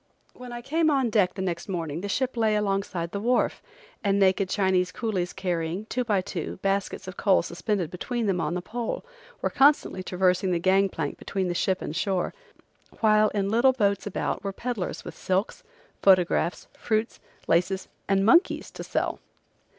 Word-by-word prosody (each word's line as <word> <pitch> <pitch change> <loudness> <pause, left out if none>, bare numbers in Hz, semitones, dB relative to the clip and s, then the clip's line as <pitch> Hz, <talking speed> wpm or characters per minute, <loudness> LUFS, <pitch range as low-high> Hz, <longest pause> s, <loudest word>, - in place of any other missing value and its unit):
When 250 -1 -10
I 240 0 -6
came 315 +4 +2
on 265 -5 +2
deck 190 -4 +2
time 190 -1 -3
next 180 +2 -3
morning 165 -3 -3
the 205 - -4
ship 260 +3 -1
lay 220 -2 +2
along 200 -2 +1
side 170 -4 -5
the 200 - -3
wharf, 245 +4 +1 0.4
and 200 -1 +2
naked 190 -1 +3
Chinese 185 -2 +1
coolies 190 -6 -2
carrying, 180 0 -2
two 250 +2 -2
by 210 -5 +1
two, 180 -3 -5
baskets 195 -1 -1
of 185 - -8
coal 195 -5 +3
suspended 180 0 -2
between 235 +6 -3
them 190 -4 +1
on 165 +3 -1
a 180 - -5
pole, 235 - -4 0.4
were - - +1
constantly 280 -8 +3
traversing 185 0 +1
the 175 - +2
gang 190 +3 +3
plank - - -4
between 190 -2 -2
the - - 0
ship 185 +2 0
and 155 - -5
shore, 190 0 0 0.7
while 215 -1 +5
in 200 -2 -1
little 245 +4 +4
boats 200 -5 +1
about 200 - -2
were 200 - -2
peddlers 235 -2 -4
with - - -7
silks, 190 +3 -1 0.4
photographs, 180 -2 +3
fruits, 220 0 -1 0.3
laces 180 +3 +1 0.2
and 195 0 +3
monkeys 335 - +3
to - - -7
sell. - - -2
195 Hz, 180 wpm, -26 LUFS, 180-220 Hz, 0.7 s, while